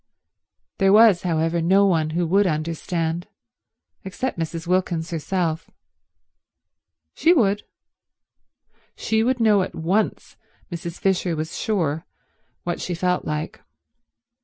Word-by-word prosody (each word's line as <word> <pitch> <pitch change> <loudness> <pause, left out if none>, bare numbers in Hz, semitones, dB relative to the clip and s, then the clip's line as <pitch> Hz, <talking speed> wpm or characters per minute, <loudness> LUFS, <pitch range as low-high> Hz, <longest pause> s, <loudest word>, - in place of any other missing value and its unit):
There 195 -1 +4
was, 210 -3 +6
however, 165 -1 0
no 190 +4 +4
one 160 -5 +2
who 175 - +1
would 195 +4 +3
understand 165 +1 -2 0.8
except 195 +2 -4
Mrs. 165 +1 -4
Wilkins 175 -2 -1
herself. 165 0 -2 1.4
She 330 +4 +4
would. 205 - +2 1.3
She 220 0 0
would 250 +2 +1
know 215 -3 +4
at 185 - -4
once, 185 +7 -1 0.3
Mrs. 170 0 -6
Fisher 185 -3 0
was 155 +1 -4
sure, 165 -7 -1 0.6
what 175 0 -3
she 180 - -3
felt 180 +1 0
like. 150 0 -4
175 Hz, 110 wpm, -23 LUFS, 165-195 Hz, 1.4 s, was